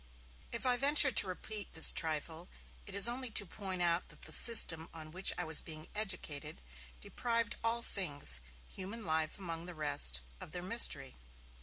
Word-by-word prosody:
If 235 - -6
I 250 -1 +3
venture 280 +1 +5
to 205 - +3
repeat 205 +2 -8
this 160 - +6
trifle, 160 +2 -4 0.4
it 200 - -8
is 200 +3 +9
only 250 +1 -5
to - - +4
point 190 -1 -6
out 170 0 0
that - - -16
the - - -6
system 165 -8 +5
on 155 -1 -9
which 185 +3 +2
I 180 - -3
was 160 -2 +1
being 155 -1 -9
educated 185 -9 -5 0.4
deprived 230 - -2
all 230 +1 -1
things, 145 - -2 0.3
human 205 +4 -8
life 160 -1 -2
among 170 -3 -7
the 180 - -8
rest, 145 - +2 0.2
of - - -11
their 175 -1 -6
mystery. 180 - 0
180 Hz, 170 wpm, -32 LUFS, 160-220 Hz, 0.4 s, is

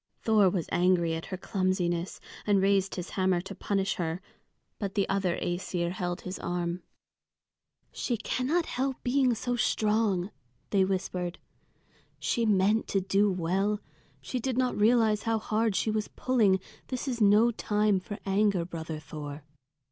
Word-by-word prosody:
Thor 215 -4 +5
was 175 -3 -2
angry 175 -2 +3
at 165 0 -4
her 185 - -4
clumsiness, 185 -2 -1 0.3
and 205 -1 +4
raised 195 0 +2
his 180 -1 -5
hammer 185 -2 +2
to 195 - -8
punish 195 -1 -1
her. 165 0 -2 0.6
But 200 -1 -3
the 200 -2 +2
other 195 -3 0
Æsir 175 -1 -2
held 180 0 -3
his 185 +1 -6
arm. 175 0 -2 1.1
"She 240 - -2
cannot 275 +10 0
help 265 +1 -2
being 255 -1 +3
so 245 +2 -2
strong," 210 -5 +1 0.4
they 195 -2 +4
whispered. 185 -2 -2 0.8
"She 230 -1 0
meant 210 +2 +3
to 195 - +1
do 195 +2 +2
well. 190 +4 0 0.4
She 250 - -3
did 255 +1 -2
not 255 -1 +1
realize 220 -1 +3
how 225 0 +1
hard 220 -1 0
she 220 - +1
was 215 -1 -1
pulling. 220 -7 +2 0.3
This 255 +2 -4
is 240 -3 -2
no 210 +3 +6
time 210 -3 +1
for 205 +2 -7
anger, 195 -3 +2
brother 160 -2 -5
Thor." 145 -1 -8
195 Hz, 150 wpm, -29 LUFS, 180-220 Hz, 1.1 s, no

